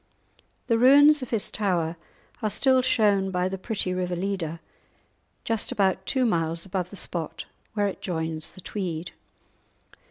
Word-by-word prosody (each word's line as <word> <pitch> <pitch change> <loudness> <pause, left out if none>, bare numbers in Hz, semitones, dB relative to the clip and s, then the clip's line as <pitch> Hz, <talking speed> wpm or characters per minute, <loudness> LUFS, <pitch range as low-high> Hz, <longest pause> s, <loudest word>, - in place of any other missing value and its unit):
The 230 -2 +2
ruins 290 +4 +7
of 255 - -5
his 225 -4 -2
tower 175 -6 0 0.5
are 215 - 0
still 260 +5 +3
shown 210 -6 +2
by 180 -1 0
the 190 0 -4
pretty 190 -2 -2
river 180 -1 -2
Leader, 175 -3 -3 0.8
just 225 -2 0
about 190 -1 +1
two 260 -2 +2
miles 165 -5 0
above 185 -2 -3
the 200 - -10
spot 165 -3 -3 0.3
where 205 -1 +2
it 195 - -6
joins 160 -2 -3
the 185 - -12
Tweed. 175 -4 -4
190 Hz, 150 wpm, -26 LUFS, 170-220 Hz, 0.8 s, ruins